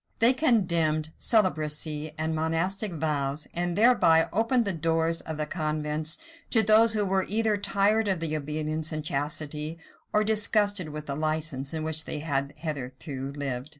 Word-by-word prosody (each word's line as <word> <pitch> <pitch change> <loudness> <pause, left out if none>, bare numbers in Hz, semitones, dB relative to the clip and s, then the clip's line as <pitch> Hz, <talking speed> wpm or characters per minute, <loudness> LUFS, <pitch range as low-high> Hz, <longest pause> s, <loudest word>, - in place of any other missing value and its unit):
They 235 +3 +5
condemned 170 - +1
celibacy 155 -7 0
and 160 +1 -1
monastic 165 +6 -1
vows, 150 -2 -1
and 175 0 -1
thereby 205 -8 +4
opened 230 +3 +2
the 200 - 0
doors 165 0 0
of 160 -1 -6
the 155 - -1
convents 155 -1 -2 0.3
to 225 -2 +5
those 220 +2 +6
who 210 -2 +1
were 190 0 0
either 220 +1 +1
tired 205 +2 +1
of 190 -3 0
the 160 -2 -2
obedience 155 +1 -3
and 155 -1 -4
chastity, 150 +2 -2 0.3
or 210 - +2
disgusted 205 -4 +2
with 150 0 -7
the 140 - -4
license, 155 -3 -2
in 160 -1 -3
which 155 0 0
they - - -4
had 145 -2 -2
hitherto 135 -2 -5
lived. 135 -1 -4
160 Hz, 155 wpm, -27 LUFS, 150-195 Hz, 0.3 s, those